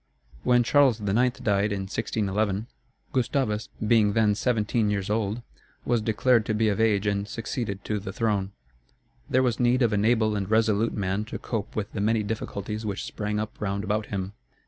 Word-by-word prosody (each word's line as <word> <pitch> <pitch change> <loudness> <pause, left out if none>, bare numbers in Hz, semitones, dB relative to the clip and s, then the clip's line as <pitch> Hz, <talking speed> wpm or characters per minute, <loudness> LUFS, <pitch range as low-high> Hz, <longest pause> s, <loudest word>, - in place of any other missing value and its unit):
When 120 - +4
Charles 135 -2 +4
IX. 115 +5 +1
died, 100 0 +1
in 100 -1 -2
1611, 105 0 -1 0.5
Gustavus, 120 -4 0 0.2
being 105 -2 +4
then 110 -1 +3
seventeen 110 -1 +1
years 105 -1 -1
old, 110 +2 -1 0.4
was 120 -2 +2
declared 115 +2 +3
to 110 - 0
be 110 0 +2
of 105 +2 0
age 105 -2 +2
and 100 0 0
succeeded 110 -3 -4
to 105 -1 -1
the 95 -1 -6
throne. 100 -2 0 0.8
There 130 +1 +3
was 125 -3 0
need 125 +1 +3
of 115 -2 +2
an 100 0 +1
able 110 -2 +3
and 100 -1 -2
resolute 110 0 +2
man 100 0 -1
to 115 - -6
cope 110 -4 -4
with 105 -2 -3
the 100 - -2
many 110 +1 +2
difficulties 105 0 -4
which 100 -2 -3
sprang 105 0 -3
up 110 +1 -5
round 100 -1 -1
about 105 +1 -1
him. 95 -1 -4
105 Hz, 180 wpm, -26 LUFS, 100-115 Hz, 0.8 s, When